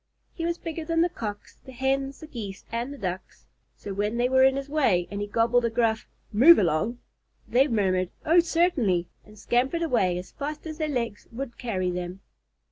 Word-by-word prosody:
He 330 Hz, -, -4 dB
was 340 Hz, 0 st, -1 dB
bigger 330 Hz, -1 st, -5 dB
than 330 Hz, +1 st, +1 dB
the 345 Hz, -, +3 dB
Cocks, 210 Hz, -11 st, -7 dB
the 260 Hz, -, -11 dB
Hens, 270 Hz, +2 st, -1 dB
the -, -, -7 dB
Geese, 210 Hz, -9 st, -7 dB
and 235 Hz, +4 st, -2 dB
the 285 Hz, -, -8 dB
Ducks, 185 Hz, -4 st, -6 dB, 0.3 s
so 200 Hz, -, -6 dB
when 210 Hz, +4 st, -1 dB
they 245 Hz, +1 st, +2 dB
were 260 Hz, 0 st, +5 dB
in 265 Hz, 0 st, +5 dB
his 275 Hz, 0 st, -4 dB
way 255 Hz, -, +2 dB
and 200 Hz, 0 st, -4 dB
he 205 Hz, -, -2 dB
gobbled 230 Hz, +3 st, +2 dB
a 235 Hz, -, +2 dB
gruff 225 Hz, -1 st, 0 dB, 0.3 s
"Move 285 Hz, +11 st, +8 dB
along," 200 Hz, +7 st, +1 dB, 0.5 s
they 265 Hz, +4 st, +4 dB
murmured 185 Hz, -7 st, +1 dB, 0.2 s
"Oh, 335 Hz, +3 st, +5 dB
certainly," 305 Hz, -, +2 dB, 0.2 s
and 210 Hz, 0 st, -16 dB
scampered 255 Hz, -, 0 dB
away 195 Hz, -, +1 dB
as 180 Hz, -, -7 dB
fast 300 Hz, +2 st, -6 dB
as 315 Hz, 0 st, -7 dB
their 310 Hz, -1 st, -1 dB
legs 235 Hz, -6 st, -3 dB
would 240 Hz, +1 st, -6 dB
carry 185 Hz, -7 st, -1 dB
them. 180 Hz, +1 st, -5 dB
240 Hz, 200 wpm, -26 LUFS, 205-285 Hz, 0.5 s, Move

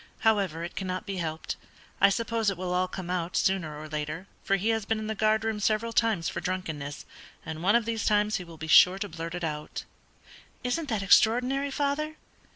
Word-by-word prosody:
However, 195 Hz, -7 st, +2 dB
it 170 Hz, -, -6 dB
cannot 185 Hz, -1 st, -3 dB
be 195 Hz, -2 st, -4 dB
helped. 160 Hz, -2 st, -3 dB, 0.4 s
I 200 Hz, -, +8 dB
suppose 225 Hz, +1 st, 0 dB
it 195 Hz, -, -3 dB
will 180 Hz, 0 st, -2 dB
all 180 Hz, +1 st, +2 dB
come 185 Hz, -1 st, -6 dB
out, 180 Hz, -1 st, -1 dB
sooner 165 Hz, -6 st, 0 dB
or 155 Hz, -, -7 dB
later, 150 Hz, +4 st, -4 dB, 0.2 s
for 195 Hz, -, +2 dB
he 200 Hz, +3 st, 0 dB
has 225 Hz, -1 st, +1 dB
been 225 Hz, +2 st, 0 dB
in 215 Hz, -, -4 dB
the 220 Hz, -, -2 dB
guardroom 220 Hz, 0 st, +1 dB
several 220 Hz, +2 st, +1 dB
times 220 Hz, -9 st, +2 dB
for -, -, -3 dB
drunkenness, 155 Hz, -6 st, -4 dB, 0.4 s
and 160 Hz, 0 st, -5 dB
one 200 Hz, +5 st, +4 dB
of 235 Hz, -2 st, +3 dB
these 230 Hz, -1 st, -2 dB
times 210 Hz, 0 st, +2 dB
he 180 Hz, -, -6 dB
will 170 Hz, -2 st, -12 dB
be 160 Hz, -, -6 dB
sure 180 Hz, +4 st, +7 dB
to 205 Hz, +1 st, -3 dB
blurt 165 Hz, +1 st, -5 dB
it 175 Hz, -, -5 dB
out.'" 150 Hz, -1 st, -4 dB, 0.8 s
"Isn't 275 Hz, +5 st, -1 dB
that 215 Hz, -4 st, 0 dB
extraordinary, 250 Hz, +7 st, +4 dB
father?" 290 Hz, +2 st, -1 dB
195 Hz, 205 wpm, -28 LUFS, 170-225 Hz, 0.8 s, I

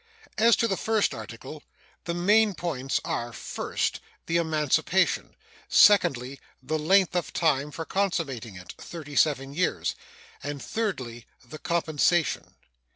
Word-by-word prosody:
As 230 Hz, +1 st, +6 dB
to 230 Hz, -, +1 dB
the 195 Hz, -, -1 dB
first 220 Hz, -2 st, +1 dB
article, -, -, -9 dB, 0.4 s
the 170 Hz, -, -2 dB
main 205 Hz, +3 st, +3 dB
points 135 Hz, -7 st, -2 dB
are, 120 Hz, 0 st, -3 dB
first, -, -, -3 dB, 0.3 s
the 165 Hz, -, +1 dB
emancipation; 160 Hz, +2 st, +1 dB, 0.3 s
secondly, 140 Hz, -10 st, +4 dB, 0.2 s
the 155 Hz, +4 st, -2 dB
length 185 Hz, +3 st, +3 dB
of 175 Hz, -, -1 dB
time 150 Hz, -4 st, +1 dB
for 160 Hz, +2 st, -6 dB
consummating 155 Hz, -, -2 dB
it 90 Hz, 0 st, -10 dB
(thirty 150 Hz, -4 st, -9 dB
seven 140 Hz, -2 st, +2 dB
years); 180 Hz, +4 st, 0 dB, 0.5 s
and, 145 Hz, 0 st, -5 dB
thirdly, 130 Hz, -, -4 dB, 0.2 s
the 155 Hz, +5 st, -9 dB
compensation. 170 Hz, 0 st, 0 dB
160 Hz, 125 wpm, -26 LUFS, 135-185 Hz, 0.5 s, As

